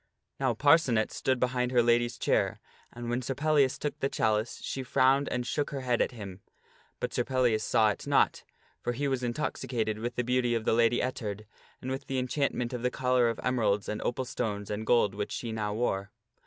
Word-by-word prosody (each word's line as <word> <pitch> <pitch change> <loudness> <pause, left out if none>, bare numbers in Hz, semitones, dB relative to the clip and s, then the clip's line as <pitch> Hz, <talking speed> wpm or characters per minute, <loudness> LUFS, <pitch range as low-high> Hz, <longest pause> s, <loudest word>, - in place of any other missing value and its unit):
Now 130 -4 +1
Parcenet 140 -5 +4
stood 130 -1 0
behind 125 0 0
her 120 -2 +4
lady's 120 0 +2
chair, - - +1 0.3
and 120 0 -7
when 120 +1 -1
Sir 130 +2 -3
Pellias 145 -2 +2
took 150 - -4
the 135 - 0
chalice 110 -1 0
she 135 - -3
frowned 135 +2 +3
and 125 -1 -2
shook 145 +4 -1
her 140 -2 -4
head 125 -2 +1
at - - +2
him. 100 -5 -9 0.6
But - - -3
Sir 125 - +1
Pellias 125 -4 +1
saw 110 0 +3
it - - -7
not, - - +2 0.4
for 120 - -1
he 140 +4 -1
was 135 -2 0
intoxicated 120 -3 -2
with 120 +2 -4
the 125 - 0
beauty 125 -1 +1
of 110 -1 -2
the - - +3
Lady 115 +1 +3
Ettard, 110 -5 -4 0.4
and 130 - -3
with 135 - -4
the 135 - -2
enchantment 125 -1 -1
of 125 - -3
the 125 - +1
collar 125 -1 +2
of 115 - -3
emeralds 110 -5 +1
and 105 - -3
opal 130 +2 -2
stones 105 -4 -3
and 105 +1 -4
gold 110 -5 +4
which 105 0 -4
she 115 - -4
now 105 -1 -2
wore. 100 -4 -1
120 Hz, 210 wpm, -29 LUFS, 110-130 Hz, 0.6 s, Parcenet